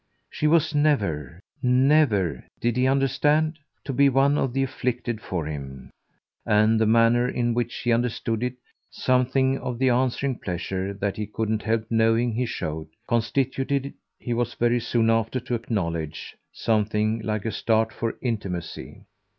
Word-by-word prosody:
She 150 - 0
was 160 0 +3
never, 100 - 0 0.2
never 125 - +3 0.2
did 120 0 0
he 125 +1 +2
understand? 150 +4 +2 0.2
to 140 - -4
be 140 +2 +5
one 135 +2 +3
of 135 -3 0
the 135 +2 0
afflicted 125 -3 -3
for 85 -4 -3
him; 70 -3 -7 0.5
and 110 +1 +3
the 110 - +3
manner 115 +2 +4
in 120 -1 0
which 120 0 -2
he 120 - +1
understood 115 -1 -1
it, 125 0 -2 0.3
something 130 +1 +1
of 125 -2 -4
the 130 +1 +2
answering 130 +1 0
pleasure 95 +2 -3
that 100 0 -2
he 105 -1 -3
couldn't 110 0 -2
help 110 0 0
knowing 115 +1 +3
he 125 +2 -1
showed, 80 -7 -4 0.2
constituted, 135 +3 0 0.2
he 120 - -4
was 120 0 -1
very 120 +1 +2
soon 115 -1 +1
after 115 +3 0
to 120 - -5
acknowledge, 85 -10 -3 0.2
something 110 0 0
like 110 -1 -3
a 115 - -1
start 110 0 +1
for 115 -1 -3
intimacy. 100 -8 -4
115 Hz, 150 wpm, -25 LUFS, 105-130 Hz, 0.5 s, be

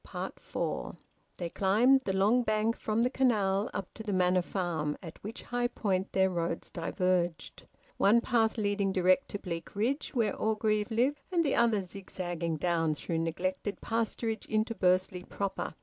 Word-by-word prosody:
FOUR. - - -3 0.4
They 170 -2 -4
climbed 235 +8 +4
the 190 - 0
long 205 +6 +4
bank 215 0 +1
from 220 +2 0
the 250 - +3
canal 210 -7 +2
up 190 - -5
to - - -9
the 215 -2 -3
Manor 185 -1 +3
Farm, 170 -5 -2
at 165 -2 -10
which 220 +4 -6
high 245 0 0
point 195 -5 -1
their 190 0 +3
roads 170 -1 -2
diverged, 175 0 -1 0.3
one 210 +4 +5
path 230 -2 +1
leading 205 -2 +1
direct 185 +7 +3
to 205 - -3
Bleakridge 205 - -3
where 220 -5 +1
Orgreave 215 0 0
lived, 260 +6 +1
and 340 -2 +2
the 285 - +2
other 225 -4 +3
zigzagging 175 -3 -4
down 165 -1 +1
through 165 +2 -3
neglected 185 +5 -2
pasturage 225 -1 -2
into 220 +2 0
Bursley 185 -2 +2
proper. 195 -3 -4
200 Hz, 155 wpm, -30 LUFS, 180-225 Hz, 0.4 s, one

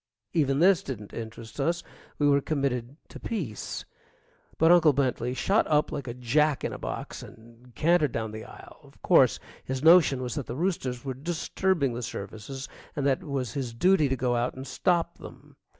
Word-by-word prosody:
Even 140 -5 +2
this 185 +3 +5
didn't 115 - -7
interest 115 +1 -8
us 170 +5 0 0.3
we 145 - +2
were 140 0 +4
committed 135 -3 -2
to - - -11
peace. 155 - -4 0.7
But 165 +1 +5
Uncle 165 -4 +6
Bentley 125 -2 0
shot 195 - +2
up 150 0 +2
like 140 -3 -5
a 120 - -5
jack 140 +4 +1
in - - -2
a - - -7
box - - -5
and 115 +2 -15
cantered 160 -3 +3
down 110 -1 -3
the 110 0 -7
aisle. - - -13
Of - - -20
course, - - +5 0.3
his 130 +1 -4
notion 160 -6 +6
was 125 - -3
that 145 -4 -4
the 120 - -5
roosters 140 -7 -2
were 135 - -2
disturbing 165 0 -1
the 120 - -4
services, 110 +5 -6 0.3
and 140 - -1
that 135 -2 +2
it - - -11
was 130 -5 -2
his 125 -5 -4
duty 180 +1 +4
to 135 - +1
go 125 0 0
out 120 +1 -1
and 130 +1 -7
stop 170 +6 0
them. - - -13
135 Hz, 190 wpm, -27 LUFS, 120-155 Hz, 0.7 s, Uncle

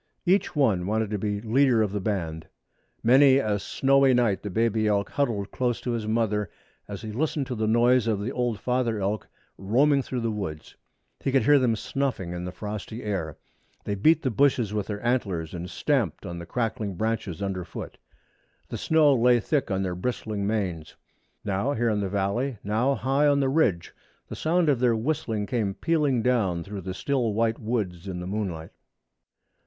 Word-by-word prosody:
Each 185 0 +2
one 105 -11 +2
wanted 110 0 0
to 105 - -1
be 105 0 -2
leader 120 0 +3
of 105 - -2
the 105 - -2
band. 85 -6 -3 0.6
Many 130 +3 +6
a 105 -6 0
snowy 135 +4 +3
night 115 -5 +2
the 105 - -5
baby 110 +1 +1
elk 100 -1 0
huddled 115 -9 -1
close 125 -2 -1
to 125 - -2
his 115 -2 -3
mother 110 -2 0 0.4
as 100 +1 -7
he 110 - -5
listened 150 +4 -1
to 125 - -4
the 110 -1 -1
noise 120 +1 +3
of 110 -3 +1
the 105 +5 -3
old 120 -5 -1
father 125 -2 0
elk 100 +1 -2 0.3
roaming 135 +9 +3
through 125 -1 -4
the 115 -1 -1
woods. 95 -8 -6 0.4
He 135 - -1
could 135 0 +3
hear 145 -1 +6
them 120 -3 +2
snuffing 125 -7 -2
the 90 - -4
frosty 105 +4 -6
air. 95 -7 -3 0.5
They 100 - -2
beat 155 +11 +3
the 130 - 0
bushes 120 -3 +2
with 105 -2 -2
their 105 +2 -5
antlers 95 -10 -1
and 90 0 -5
stamped 120 - -1
on 85 -2 -6
the 85 - -9
crackling 110 -2 -2
branches 110 -4 -2
underfoot. 95 -4 -5 0.7
The - - -5
snow 155 -3 +4
lay 120 -1 +4
thick 140 +5 -1
on 95 0 0
their 90 -1 -2
bristling 105 +1 -3
manes. 90 -7 -2 0.5
Now 100 +7 0
here 120 -1 +1
in 105 -1 0
the 100 -2 -2
valley, 105 +6 -1
now 115 +7 +1
there - - -11
high 135 +3 +3
on 140 -1 +3
the 135 -1 +1
ridge, 130 - +1 0.4
the - - -5
sound 170 +1 +1
of 140 -5 +3
their 120 -2 +3
whistling 110 -4 -1
came 105 -4 -1
pealing 150 -8 +1
down 100 -9 +1
through 100 +1 -7
the 95 +1 -5
still 120 -2 -1
white 115 0 +1
woods 100 -6 -3
in 90 -2 -4
the 90 - -5
moonlight. 90 -5 -4
110 Hz, 190 wpm, -26 LUFS, 100-130 Hz, 0.7 s, Many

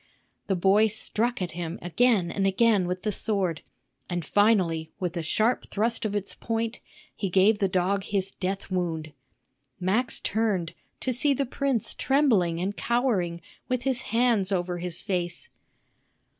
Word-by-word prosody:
The 195 - +1
boy 195 +4 +4
struck 220 +1 -1
at 175 - -3
him 170 0 -5
again 185 0 +2
and 195 -1 +1
again 200 -1 +3
with 180 +1 -3
the 215 - 0
sword, 190 -5 -1 0.5
and 175 -2 -2
finally 180 -6 +2
with 180 -1 -2
a 170 - -1
sharp 220 +9 +1
thrust 225 +3 0
of 210 -1 -1
its 200 -1 -1
point 225 0 -3 0.4
he 195 - -2
gave 195 +4 +4
the 195 - +2
dog 190 +2 0
his 195 -1 -1
death 195 +1 -4
wound. 165 -4 -2 0.7
Max 210 +8 +1
turned, 200 -6 0 0.3
to 255 - 0
see 275 +4 +2
the 275 - 0
prince 265 -3 -1
trembling 220 - +2
and 195 +3 -2
cowering, 205 -10 0 0.3
with 255 -1 0
his 265 -2 0
hands 225 -4 +2
over 180 -2 -1
his 175 -1 -2
face. 185 - -3
195 Hz, 155 wpm, -26 LUFS, 180-230 Hz, 0.7 s, boy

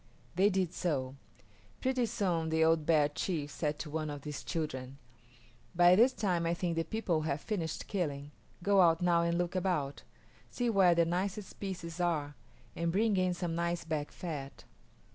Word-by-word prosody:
They 195 +3 +4
did 185 -3 0
so. 135 -6 -2 0.6
Pretty 255 -2 +1
soon 185 -8 -1
the 160 0 +2
old 160 -2 +2
bear 155 -3 +5
chief 150 -1 -3
said 150 0 -2
to 150 - -6
one 155 0 -2
of 145 -1 -6
his 150 -1 -6
children, 140 -5 -4 0.8
"By 175 +1 +7
this 240 +6 +6
time 180 -8 0
I 170 - +1
think 175 -1 -2
the 165 - +1
people 180 -6 -1
have 155 -2 -1
finished 165 -4 -3
killing. 145 -7 -3 0.3
Go 200 0 +5
out 165 -1 +4
now 170 -1 +4
and 170 0 +1
look 175 +1 -1
about; 175 -7 -1 0.5
see 245 -1 -1
where 190 -4 +5
the 170 0 +4
nicest 190 +4 -3
pieces 180 -4 -5
are, 155 -4 0 0.4
and 170 0 0
bring 210 +3 +2
in 185 -1 +1
some 175 -2 -3
nice 170 +1 -1
back 155 -3 -3
fat." 145 -6 -6
170 Hz, 175 wpm, -32 LUFS, 155-185 Hz, 0.8 s, By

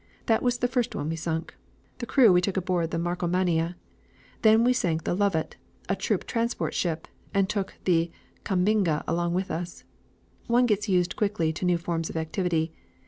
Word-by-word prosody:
That 225 -1 +2
was 245 -1 +1
the 245 - +1
first 245 -1 -1
one 145 - -2
we 165 - -1
sunk. 160 0 -3 0.5
The 240 - -4
crew 235 -8 +6
we 180 - +5
took 190 +1 -1
aboard 180 -3 0
the 165 - -2
Markomannia. 175 0 0 0.7
Then 220 +1 +6
we 250 +1 +4
sank 165 -9 0
the - - -1
Lovat, 195 -5 0 0.3
a - - +2
troop - - -1
transport 235 0 -1
ship, 165 -2 -2 0.3
and 195 -1 +3
took 200 -1 -3
the 170 -2 +3 0.3
Kambinga 185 -4 +1
along 170 +1 0
with 185 +1 -1
us. 175 +1 -5 0.6
One 240 +1 +4
gets 210 -2 0
used 180 -2 +2
quickly 200 -7 0
to 170 - -4
new 180 -1 +3
forms 165 -1 -3
of - - -5
activity. 160 0 -1
180 Hz, 180 wpm, -27 LUFS, 165-210 Hz, 0.7 s, crew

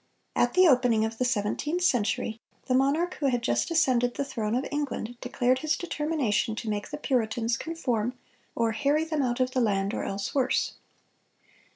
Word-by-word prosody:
At 245 +5 +2
the 370 0 +7
opening 245 -6 +4
of 225 0 -5
the 255 - +2
seventeenth 250 - -1
century 230 - 0 0.2
the 255 - 0
monarch 285 +7 +2
who 285 - +1
had 245 -3 0
just - - +1
ascended 250 -7 +2
the 280 - -2
throne 225 -4 -2
of 255 - 0
England 280 -5 -3
declared 250 +1 +1
his 310 +2 0
determination 295 -10 -1
to 225 0 -4
make 205 0 -3
the 295 - -5
Puritans 235 -4 0
"conform, 250 -6 -2 0.4
or... 230 -1 +1
harry 285 +7 +1
them 315 -2 -1
out 245 -1 0
of 255 0 +1
the 255 - +1
land, 200 -2 +1
or - - -2
else 195 0 -3
worse." 260 -2 +1
250 Hz, 180 wpm, -27 LUFS, 225-290 Hz, 0.4 s, the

